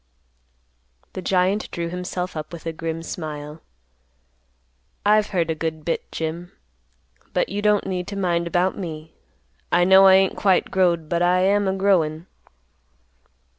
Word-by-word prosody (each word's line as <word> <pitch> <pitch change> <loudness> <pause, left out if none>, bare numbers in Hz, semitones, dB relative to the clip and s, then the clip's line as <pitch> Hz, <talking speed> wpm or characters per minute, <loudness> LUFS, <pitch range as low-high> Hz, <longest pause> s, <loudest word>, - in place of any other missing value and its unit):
The 185 - -5
giant 185 +3 +1
drew 170 0 -4
himself 180 0 -4
up 155 -1 -6
with 170 -2 -10
a 165 - -3
grim 165 0 -5
smile, 150 -2 -7 1.4
"I've 210 0 +4
heard 170 -5 -1
a - - +1
good 160 -1 -4
bit, 165 - -3
Jim. 170 +3 -5 0.8
But - - 0
you 205 - -3
don't 210 -1 +2
need 180 -2 -3
to 200 - -6
mind 170 -3 0
about 180 +2 +1
me; 160 -4 -7 0.6
I 175 +1 +4
know 190 +1 +7
I 190 - +8
ain't 190 0 +3
quite 190 -3 +2
growed, 175 -4 +1
but 170 +2 -1
I 180 +1 +3
am 200 +1 +2
a 190 - +1
growin'." 175 -5 +1
175 Hz, 150 wpm, -22 LUFS, 165-190 Hz, 1.4 s, I